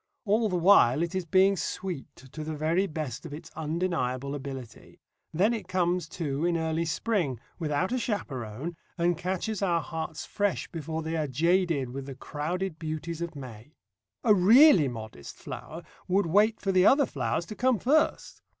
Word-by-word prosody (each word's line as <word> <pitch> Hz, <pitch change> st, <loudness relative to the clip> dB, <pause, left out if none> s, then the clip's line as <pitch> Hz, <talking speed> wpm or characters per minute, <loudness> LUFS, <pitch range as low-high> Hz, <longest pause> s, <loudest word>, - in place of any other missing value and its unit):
All 215 Hz, +2 st, +2 dB
the 185 Hz, -, -1 dB
while 170 Hz, -6 st, +5 dB
it 170 Hz, -, -3 dB
is 185 Hz, -2 st, -2 dB
being 190 Hz, +3 st, +4 dB
sweet, 180 Hz, -6 st, -5 dB
to 135 Hz, +4 st, -9 dB
the 155 Hz, 0 st, -4 dB
very 165 Hz, +6 st, +1 dB
best 155 Hz, -5 st, -5 dB
of 155 Hz, -4 st, -7 dB
its 165 Hz, +2 st, -11 dB
undeniable 150 Hz, -5 st, -2 dB
ability. 135 Hz, -4 st, -8 dB, 0.3 s
Then 200 Hz, +8 st, +2 dB
it 225 Hz, -, -5 dB
comes, 175 Hz, -2 st, 0 dB
too, 150 Hz, -4 st, -3 dB
in 170 Hz, -1 st, +2 dB
early 160 Hz, 0 st, -1 dB
spring, 165 Hz, -, -1 dB, 0.2 s
without 160 Hz, +4 st, -1 dB
a 255 Hz, -, 0 dB
chaperon, 140 Hz, -, -4 dB, 0.2 s
and 175 Hz, 0 st, +2 dB
catches 185 Hz, +5 st, -3 dB
our 175 Hz, -4 st, +2 dB
hearts 160 Hz, -1 st, -5 dB
fresh 205 Hz, -2 st, -1 dB
before 160 Hz, -1 st, -4 dB
they 160 Hz, +1 st, -3 dB
are 155 Hz, -2 st, -1 dB
jaded 165 Hz, -1 st, +1 dB
with 135 Hz, +1 st, -6 dB
the 135 Hz, -, -7 dB
crowded 165 Hz, +5 st, -4 dB
beauties 160 Hz, +1 st, -4 dB
of 170 Hz, -1 st, -4 dB
May. 125 Hz, 0 st, -10 dB, 0.5 s
A 220 Hz, -, +6 dB
really 205 Hz, -, +7 dB
modest 110 Hz, -, -8 dB
flower 165 Hz, +2 st, -8 dB, 0.2 s
would 195 Hz, +1 st, +2 dB
wait 210 Hz, +6 st, +3 dB
for 195 Hz, -, -1 dB
the 185 Hz, -1 st, +4 dB
other 280 Hz, +1 st, +5 dB
flowers 135 Hz, -, -2 dB
to 215 Hz, -, -8 dB
come 255 Hz, +1 st, +2 dB
first. 290 Hz, -, +1 dB
165 Hz, 170 wpm, -28 LUFS, 145-190 Hz, 0.5 s, really